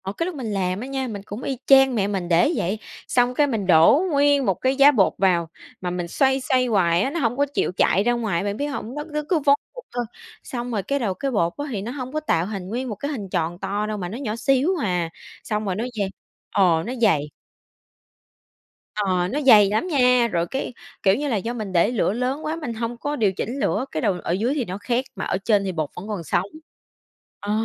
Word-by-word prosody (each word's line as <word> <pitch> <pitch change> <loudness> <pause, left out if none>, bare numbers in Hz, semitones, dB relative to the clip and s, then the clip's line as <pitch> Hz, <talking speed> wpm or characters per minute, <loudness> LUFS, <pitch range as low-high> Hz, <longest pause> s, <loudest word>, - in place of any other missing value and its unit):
Ờ, 190 - -3
cái 335 - 0
lúc 360 -1 -4
mình 260 -5 -5
làm 185 -1 -1
á 250 - -6
nha 270 -1 -3
mình 205 -4 -6
cũng 210 +4 -7
y 270 - -2
chang 270 -2 +6
mẹ 200 -3 +1
mình 195 -4 -2
để 170 - +4
vậy, 195 +5 -1 0.3
xong 245 0 +2
cái 290 +3 +3
mình 220 -8 -2
đổ 170 - +6
nguyên 285 -1 +3
một 195 - +3
cái 260 +8 0
giá 280 +1 +7
bột 210 -9 +3
vào 175 -4 +2 0.3
mà 180 - -2
mình 175 -1 -3
xoay, 265 +8 +2
xoay 255 0 +2
hoài 180 -7 +2
á 235 - +1
nó 335 +4 -3
hổng 245 -3 0
có 285 - +3
chịu - - 0
chạy 195 - +3
ra 240 +2 +2
ngoài, 215 -7 -1
bạn 205 0 -2
biết 285 - -1
hông? 265 -3 -5
Nó 295 - -3
cứ 300 0 -1
cứ 350 -4 +3
vón 280 -1 +4 0.2
cục - - -10
thôi, 245 -1 -1 0.4
xong 245 -1 -5
rồi 210 -4 -1
cái 280 +6 -1
đầu 215 -7 -1
cái 275 +8 -3
bột 170 -7 +1
á 290 - -3
thì 205 -5 -3
nó 225 +4 -5
hông 260 0 -6
có 310 - 0
tạo 175 - 0
hình 195 -3 -5
nguyên 250 +4 -3
một 215 - -4
cái 285 +9 -4
hình 210 -9 -5
tròn 175 -1 -2
to 200 +2 -2
đâu 215 0 -3
mà 180 -3 -4
nó 220 - -6
nhỏ 230 -6 -3
xíu 265 +6 +2
à, 180 -5 0 0.3
xong 210 0 -2
rồi 190 -2 -1
nó 220 - -2
dày 200 -2 0 0.4
ờ, 170 -5 +3
nó 240 - -4
dày. 150 -9 +2 1.6
Ờ, 185 -4 0
nó 285 +10 -2
dày 215 -7 +7
lắm 215 - 0
nha 250 -6 +4
rồi 170 -5 -1
cái 265 +4 -4 0.3
kiểu 190 0 +5
như 290 +5 -2
là 250 - 0
do 225 +5 -3
mình 215 -5 -5
để 175 +5 +3
lửa 215 -4 +1
lớn 255 +5 -2
quá 310 +1 -1
mình 300 -8 -5
hông 230 +1 -4
có 290 +4 -3
điều 215 -7 +2
chỉnh 235 +8 -4
lửa 265 - 0
cái - - -2
đầu 205 -5 +2
ở - - -2
dưới 220 +9 +1
thì 280 -5 -1
nó 185 0 -5
khét 240 +5 -1
mà - - -4
ở - - 0
trên 200 +1 +2
thì 190 - -2
bột 155 -4 -2
vẫn 190 - -8
còn 205 -5 -4
sống. 175 +4 0 0.9
Ờ, 205 - -4
220 Hz, 255 wpm, -23 LUFS, 190-265 Hz, 1.6 s, giá